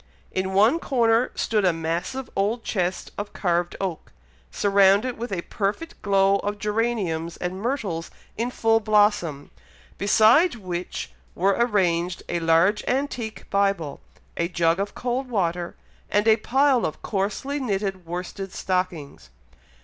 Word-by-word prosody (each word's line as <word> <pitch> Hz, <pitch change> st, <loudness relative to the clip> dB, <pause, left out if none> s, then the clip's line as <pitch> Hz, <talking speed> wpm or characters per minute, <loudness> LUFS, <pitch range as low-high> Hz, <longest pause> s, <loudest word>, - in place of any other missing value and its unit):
In 190 Hz, 0 st, -2 dB
one 225 Hz, +11 st, +5 dB
corner 235 Hz, -4 st, +2 dB
stood 215 Hz, -2 st, 0 dB
a 180 Hz, -, +4 dB
massive 165 Hz, +11 st, -3 dB
old 215 Hz, +4 st, 0 dB
chest 180 Hz, -3 st, -2 dB
of 205 Hz, 0 st, -5 dB
carved 175 Hz, -2 st, 0 dB
oak, 185 Hz, -4 st, -4 dB, 0.4 s
surrounded 200 Hz, +4 st, +3 dB
with 235 Hz, +1 st, -6 dB
a 175 Hz, -3 st, -2 dB
perfect 215 Hz, +12 st, -3 dB
glow 195 Hz, -1 st, +3 dB
of 205 Hz, +1 st, -3 dB
geraniums 205 Hz, -6 st, -1 dB
and 180 Hz, +2 st, -4 dB
myrtles 210 Hz, -10 st, -2 dB, 0.3 s
in 235 Hz, +3 st, -1 dB
full 225 Hz, -2 st, +2 dB
blossom; 205 Hz, -9 st, +1 dB, 0.5 s
beside 220 Hz, -, +5 dB
which 180 Hz, -4 st, -5 dB, 0.2 s
were 195 Hz, +2 st, +2 dB
arranged 180 Hz, -7 st, +1 dB
a 175 Hz, -, 0 dB
large 165 Hz, +5 st, +3 dB
antique 250 Hz, -4 st, -2 dB
Bible, 195 Hz, -7 st, 0 dB, 0.4 s
a 170 Hz, -, +1 dB
jug 170 Hz, 0 st, +1 dB
of 200 Hz, +1 st, -3 dB
cold 255 Hz, +1 st, -2 dB
water, 175 Hz, -6 st, -1 dB, 0.3 s
and 210 Hz, +2 st, +2 dB
a 220 Hz, 0 st, +6 dB
pile 265 Hz, +2 st, +2 dB
of 155 Hz, -, -3 dB
coarsely 210 Hz, +8 st, -2 dB
knitted 195 Hz, -6 st, -2 dB
worsted 180 Hz, +3 st, -6 dB
stockings. 170 Hz, -, -3 dB
200 Hz, 135 wpm, -24 LUFS, 175-225 Hz, 0.5 s, a